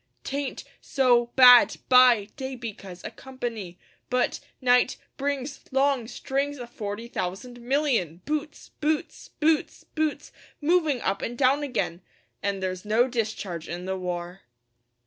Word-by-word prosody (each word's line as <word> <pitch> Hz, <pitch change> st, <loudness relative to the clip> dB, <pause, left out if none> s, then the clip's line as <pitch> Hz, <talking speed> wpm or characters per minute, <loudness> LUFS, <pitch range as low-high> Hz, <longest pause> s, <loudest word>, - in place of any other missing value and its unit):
'Tain't 280 Hz, 0 st, -4 dB, 0.2 s
so 245 Hz, -3 st, +3 dB
bad 250 Hz, -2 st, +8 dB
by 250 Hz, -5 st, +6 dB
day 265 Hz, -2 st, -5 dB
because 200 Hz, -7 st, -8 dB
o' -, -, -5 dB
company, 235 Hz, -9 st, -6 dB, 0.3 s
But 250 Hz, 0 st, +1 dB, 0.2 s
night 250 Hz, 0 st, +3 dB, 0.2 s
brings 280 Hz, 0 st, -3 dB
long 270 Hz, -3 st, +2 dB
strings 275 Hz, +4 st, -2 dB
o' 245 Hz, -, -6 dB
forty 225 Hz, -1 st, -6 dB
thousand 235 Hz, +4 st, -5 dB
million 240 Hz, -, 0 dB
Boots 305 Hz, 0 st, -4 dB
boots 305 Hz, 0 st, -2 dB
boots 315 Hz, 0 st, +1 dB
boots 310 Hz, -1 st, -3 dB, 0.3 s
moving 310 Hz, -5 st, +2 dB
up 195 Hz, -, -1 dB
and 240 Hz, +1 st, -4 dB
down 275 Hz, +2 st, +3 dB
again! 245 Hz, -, -2 dB, 0.4 s
An' 200 Hz, -1 st, -2 dB
there's 185 Hz, -1 st, -3 dB
no 220 Hz, +4 st, +3 dB
discharge 215 Hz, -8 st, -3 dB
in 175 Hz, +1 st, -5 dB
the 190 Hz, 0 st, -2 dB
war. 180 Hz, 0 st, -5 dB
245 Hz, 130 wpm, -26 LUFS, 200-275 Hz, 0.4 s, bad